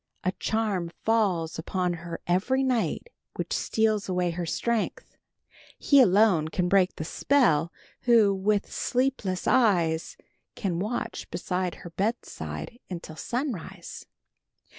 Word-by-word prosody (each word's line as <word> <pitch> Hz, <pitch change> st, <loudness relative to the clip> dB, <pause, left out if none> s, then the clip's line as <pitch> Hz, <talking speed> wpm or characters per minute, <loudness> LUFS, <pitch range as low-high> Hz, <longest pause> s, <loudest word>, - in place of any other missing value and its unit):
A 185 Hz, -, +1 dB
charm 210 Hz, -6 st, -1 dB
falls 190 Hz, -9 st, +1 dB
upon 180 Hz, +2 st, -1 dB
her 170 Hz, -1 st, -6 dB
every 215 Hz, +10 st, +1 dB
night 260 Hz, -, 0 dB, 0.3 s
which -, -, -3 dB
steals 215 Hz, -3 st, +1 dB
away 180 Hz, -1 st, +1 dB
her 170 Hz, 0 st, -4 dB
strength. 235 Hz, +5 st, -2 dB, 0.6 s
He 280 Hz, -2 st, +5 dB
alone 195 Hz, -7 st, +4 dB
can 180 Hz, +3 st, -1 dB
break 190 Hz, 0 st, +3 dB
the -, -, -4 dB
spell, 170 Hz, -, +2 dB, 0.3 s
who, 225 Hz, -5 st, +5 dB
with 200 Hz, +1 st, 0 dB
sleepless 250 Hz, -8 st, -1 dB
eyes, 175 Hz, -10 st, +2 dB, 0.4 s
can 180 Hz, -6 st, -2 dB
watch 215 Hz, +6 st, -3 dB
beside 180 Hz, +1 st, -2 dB
her 170 Hz, -, -8 dB
bedside 230 Hz, +4 st, -4 dB
until 170 Hz, -3 st, -7 dB
sunrise." 240 Hz, -, -5 dB
195 Hz, 120 wpm, -27 LUFS, 175-225 Hz, 0.6 s, He